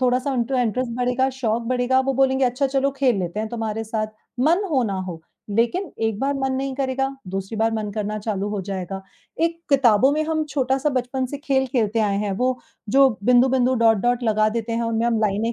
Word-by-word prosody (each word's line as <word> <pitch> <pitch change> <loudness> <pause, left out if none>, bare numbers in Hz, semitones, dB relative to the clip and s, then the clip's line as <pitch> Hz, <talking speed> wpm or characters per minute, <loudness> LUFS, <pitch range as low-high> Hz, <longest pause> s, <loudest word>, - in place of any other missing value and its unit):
थोड़ा-सा 255 +2 +1
int 240 0 -1
interest 250 -1 0
बढ़ेगा, 250 +1 +1
शौक 235 -3 -1
बढ़ेगा, 255 +1 +2
वो 270 +1 0
बोलेंगे 265 0 +3
अच्छा 250 +3 +1
चलो 270 +1 +1
खेल 260 -5 +2
लेते 180 +3 -3
हैं 220 - -3
तुम्हारे 225 -1 -3
साथ, 215 0 -2 0.3
मन 335 +9 +3
हो 265 -4 +2
ना 200 -3 -2
हो, 165 -2 -6 0.3
लेकिन 235 - 0 0.2
एक 215 -2 -2
बार 280 +1 0
मन 270 -1 -1
नहीं 265 0 -2
करेगा, 270 0 -1 0.2
दूसरी 195 +3 -4
बार 225 +1 +1
मन 215 -1 -3
करना 215 0 -2
चालू 205 -1 -2
हो 205 -2 -2
जाएगा। 190 0 -5 0.4
एक 335 0 0
किताबों 260 -1 +5
में 310 +1 +1
हम 315 -1 0
छोटा-सा 265 +1 +1
बचपन 255 0 -1
से 285 +3 -6
खेल 265 -1 +2
खेलते 225 -3 +1
आए 200 -2 +1
हैं, 205 -1 -1
वो 250 +5 0 0.3
जो 270 +4 +6 0.2
बिंदु-बिंदु, 255 +1 +4
डॉट-डॉट 235 +1 +2
लगा 215 -1 +2
देते 230 +1 -3
हैं, 230 +1 0
उनमें 230 0 0
हम 230 -2 +1
लाइनें 215 +2 0
245 Hz, 205 wpm, -22 LUFS, 215-265 Hz, 0.4 s, जो